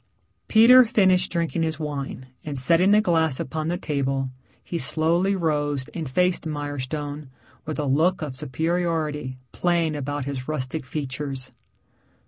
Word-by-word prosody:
Peter 245 +3 +8
finished 190 -5 +3
drinking 170 -1 -1
his 160 -1 -1
wine 140 -4 -4 0.2
and 145 -2 -5
setting 165 +8 +3
the 210 +1 +6
glass 160 -8 +1
upon 155 +3 -3
the 175 +2 -1
table, 135 -4 -1 0.3
he 170 - -4
slowly 170 +6 +2
rose 145 -6 -1
and 160 -5 -5
faced 180 +4 +1
Mirestone 145 0 -4 0.4
with 155 - -3
a 150 - -1
look 160 +6 +2
of 140 -4 -5
superiority 155 -1 -2
playing 170 -3 +1
about 145 -1 -3
his 135 -2 -4
rustic 145 -1 -3
features. 135 -2 -5
155 Hz, 135 wpm, -24 LUFS, 140-170 Hz, 0.4 s, Peter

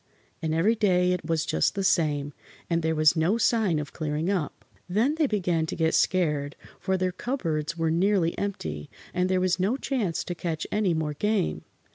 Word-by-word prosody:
And 160 - -1
every 165 +8 +3
day 180 -5 +2
it 180 - -1
was 160 -1 0
just 80 - +1
the 195 - -1
same, 150 -6 +1 0.4
and 170 0 +2
there 160 0 0
was 155 +1 +4
no 170 +7 +2
sign 220 -7 +2
of 150 -1 -5
clearing 155 +3 -2
up. 180 -7 -3 0.2
Then 225 +10 +2
they 315 -2 +1
began 175 -7 0
to - - -4
get 160 -1 +1
scared, 150 -6 +1 0.2
for 190 0 0
their 185 0 0
cupboards 170 - -3
were 165 -1 +1
nearly 180 0 +2
empty, 80 - -4 0.2
and 180 0 +1
there 185 0 +2
was 185 0 +1
no 205 +8 +1
chance 235 - -1
to 175 - -4
catch 165 -2 -3
any 205 -5 +1
more 155 -1 -1
game. 210 +3 -1
175 Hz, 190 wpm, -26 LUFS, 160-200 Hz, 0.4 s, was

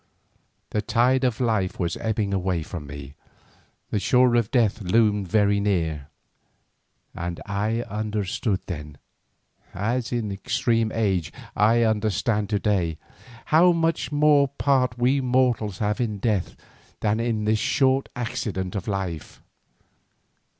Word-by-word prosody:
The 105 - 0
tide 125 +4 +2
of 125 -4 0
life 110 -7 0
was 85 -2 -1
ebbing 110 -3 -1
away 90 -3 -1
from 75 -3 -7
me, 70 -1 -9 0.8
the 105 - +1
shore 125 +3 +3
of 120 -3 +2
death 115 -4 +1
loomed 105 0 +2
very 100 +1 +2
near, 80 -8 -1 1.1
and 85 0 -5
I 105 +3 -1
understood 105 -1 -2
then, 75 -5 -7 0.8
as 115 +6 -1
in 115 -4 -2
extreme 115 +2 0
old - - -3
age 95 -7 0 0.2
I 115 +3 +4
understand 105 -1 0
to 105 - +1
day, 90 -6 0 0.6
how 175 +3 +6
much 165 -1 0
more 145 -1 +4
part 130 -3 +1
we 130 +3 +2
mortals 125 -6 +1
have 105 +2 -1
in 110 -4 -1
death 100 -3 -1 0.5
than 105 +1 +1
in 115 -2 -1
this 110 0 +2
short 135 +2 +2
accident 115 -7 -3
of 100 0 -4
life. 95 -6 -4
105 Hz, 130 wpm, -24 LUFS, 95-120 Hz, 1.1 s, how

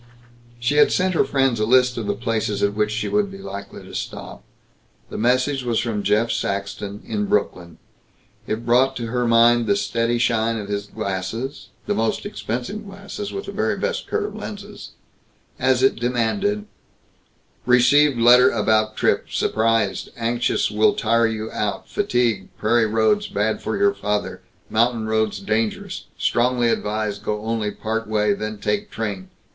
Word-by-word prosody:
She 130 +5 0
had 150 - +6
sent 185 0 +1
her - - +3
friends 135 -4 +1
a 110 - +2
list 125 0 +4
of 115 -3 -4
the 100 - 0
places 110 -2 -1
at 100 0 +2
which 105 0 0
she 110 +2 -2
would 205 -1 +1
be 195 - -9
likely 100 - -8
to - - -13
stop. - - -6 0.7
The - - -5
message 130 +4 +1
was 120 -2 0
from 110 -3 -2
Jeff 105 +4 +2
Saxton, 100 +1 -3
in 210 -1 -2
Brooklyn. 90 - -1 0.7
It 110 +2 -3
brought 130 +3 +3
to 120 - -4
her 125 0 0
mind 115 0 +5
the 100 - +3
steady 115 +4 0
shine 115 -1 +1
of 105 -2 -6
his 100 0 -3
glasses 100 +8 -4 0.2
the - - 0
most 115 0 -1
expensive 120 - -4
glasses, 200 0 -7
with 395 - -5
the - - -6
very - - -1
best 485 -1 -2
curved 425 -1 -2
lenses 205 0 -8 0.7
as 130 0 +2
it 135 - +4
demanded: 125 - 0 1.0
"Received 125 +3 +5
letter 125 +2 +7
about 110 -1 +1
trip - - +1
surprised 115 0 0
anxious 120 -1 0
will 105 +1 +3
tire 115 +1 +2
you 110 0 -4
out 105 -1 -3
fatigue 120 - 0
prairie 115 +1 +2
roads 115 - +2
bad 110 +2 -1
for - - -2
your 200 0 +3
father 105 - -3 0.3
mountain 115 0 +1
roads 110 -2 0
dangerous 110 +2 -2
strongly 120 0 +2
advise 105 -2 -1
go 105 +1 -3
only 110 -1 -1
part 110 +2 -3
way 105 -1 +2
then 110 +1 -4
take 105 0 -2
train. 100 -4 -4
115 Hz, 160 wpm, -22 LUFS, 105-125 Hz, 1.0 s, letter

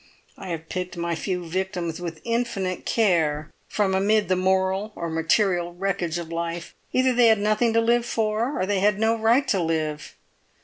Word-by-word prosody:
I 190 - -9
have 165 -2 -5
picked 180 0 -5
my 170 0 -1
few 180 +1 -3
victims 180 -1 -3
with 165 -3 -6
infinite 230 -6 -2
care 160 -9 +1 0.2
from 200 -2 0
amid 205 +2 +2
the 185 - +3
moral 190 +2 +1
or 170 -1 -4
material 175 +2 +1
wreckage 180 -3 -2
of 170 -1 -6
life; 170 0 -4 0.2
either 255 0 +3
they 240 -1 +5
had 220 -1 +5
nothing 215 +3 +2
to 230 - +4
live 235 +1 +2
for, 225 +5 -1
or 185 - +1
they 200 0 0
had 205 0 +3
no 225 +1 +2
right 230 +5 +2
to 195 - +2
live. 155 -2 -2
190 Hz, 180 wpm, -24 LUFS, 170-215 Hz, 0.2 s, they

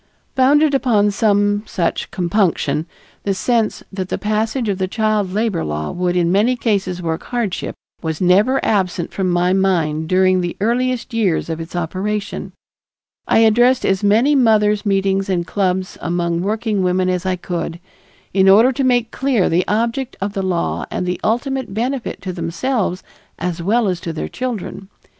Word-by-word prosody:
Founded 285 +3 +4
upon 220 -7 +2
some 205 0 +2
such 170 -2 -2
compunction, 170 -5 0 0.3
the 195 -1 -1
sense 230 +1 0
that 190 -1 -4
the - - -1
passage 220 +3 -1
of 200 -2 -1
the 190 - 0
child 215 -2 0
labor 210 -3 0
law 75 0 -3
would 180 0 -1
in 175 -1 +2
many 215 +7 +3
cases 195 -6 -1
work 160 0 -2
hardship, 235 -7 -3 0.3
was 160 -2 -3
never 200 +9 +3
absent 185 -5 0
from 190 -2 -1
my 175 +1 +2
mind 165 -5 +1
during 185 0 +3
the 175 -1 -4
earliest 245 +3 0
years 195 -7 0
of 160 - -4
its 165 +2 -8
operation. 195 +5 -3 0.8
I - - +4
addressed 240 +4 +4
as 195 +1 +1
many 225 +8 +4
mothers' 215 -5 +3
meetings 195 0 +1
and 175 -2 0
clubs 185 -1 -1
among 170 0 -1
working 215 +1 -1
women 185 0 +1
as 180 -1 0
I 185 -1 0
could, 170 -1 -4 0.5
in 190 0 +4
order 225 +7 +6
to 270 +1 -2
make 245 -3 +2
clear 260 -8 +1
the 175 +2 +1
object 235 +5 -1
of 200 +1 -3
the 195 - -2
law 180 -3 -1
and 180 - -3
the 180 0 -3
ultimate 250 -1 -1
benefit 245 -3 -3
to 185 -2 -4
themselves 180 +4 -2 0.3
as 175 -1 -3
well 215 +5 +2
as 180 -2 -1
to 165 - -4
their 155 - -4
children. 225 -6 -5
195 Hz, 165 wpm, -19 LUFS, 180-225 Hz, 0.8 s, order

